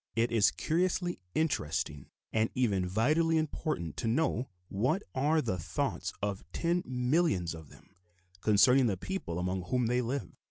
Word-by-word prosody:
It 115 +1 +2
is 110 -3 +5
curiously 175 +1 0 0.2
interesting 80 - -1 0.3
and 110 0 +2
even 100 -8 +1
vitally 155 - +2
important 150 - -2
to - - -2
know 125 0 +1 0.2
what 130 - 0
are 150 +4 +2
the 95 -6 -1
thoughts 80 - -2
of 100 -2 -2
ten 175 +1 +1
millions 125 - +1
of 80 -3 -10
them - - -18 0.5
concerning 125 +5 +5
the 100 -4 0
people 190 - -4
among 90 0 -2
whom 125 +2 +1
they 125 +2 +2
live. 125 +3 -3
120 Hz, 150 wpm, -31 LUFS, 95-155 Hz, 0.5 s, is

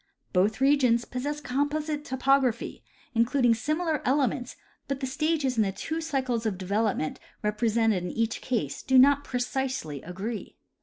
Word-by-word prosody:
Both 200 +5 +2
regions 260 -4 +4
possess 290 +4 -3
composite 295 +2 -1
topography, 260 -3 +1 0.3
including 240 +1 +3
similar 305 +6 -1
elements; 265 -2 0 0.3
but 275 -1 -2
the 270 - -2
stages 275 -1 0
in - - +4
the 200 -2 +1
two 320 - -4
cycles 260 -7 -1
of 200 -4 -2
development 200 -3 -1 0.2
represented 215 -2 +1
in 180 - -3
each 225 0 -1
case 190 - -2
do 260 0 +3
not 280 +2 +6
precisely 250 - -2
agree. 200 +6 -6
250 Hz, 140 wpm, -27 LUFS, 220-280 Hz, 0.3 s, not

